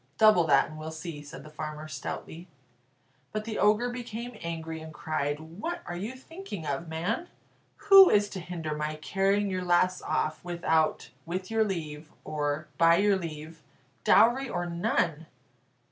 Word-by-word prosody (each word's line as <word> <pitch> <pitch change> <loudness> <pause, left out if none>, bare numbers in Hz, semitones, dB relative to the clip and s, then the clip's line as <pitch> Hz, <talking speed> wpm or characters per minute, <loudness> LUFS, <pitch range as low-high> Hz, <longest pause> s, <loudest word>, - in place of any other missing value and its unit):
"Double 215 -6 +6
that, 140 -3 +4
and 155 0 -10
we'll 155 +1 -5
see," 160 -1 -7
said 145 - -10
the 155 - -11
farmer, 155 0 -6
stoutly. 160 +2 -6 0.8
But 215 0 -3
the 225 -1 -4
Ogre 210 +4 +3
became 240 0 -6
angry, 160 -1 -5
and 160 0 -9
cried; 150 -1 -2
"What 205 - -6
are 175 - -5
you 205 +8 -4
thinking 260 - -8
of, 145 +3 -3
man? 165 - -2 0.6
Who 390 -2 +10
is 205 0 +4
to 195 - -6
hinder 165 -3 -4
my 150 0 -2
carrying 195 +6 +1
your 185 -1 -2
lass 180 +1 +2
off, 155 0 -1
without 170 -3 0 0.2
'with 185 +4 -4
your 225 0 +3
leave' 155 -6 -4
or 150 0 -2
'by 165 0 +6
your 200 +2 +3
leave,' 160 -2 -7 0.4
dowry 240 +5 +5
or 175 -3 -2
none?" 170 -3 -1
170 Hz, 160 wpm, -28 LUFS, 155-205 Hz, 0.8 s, Who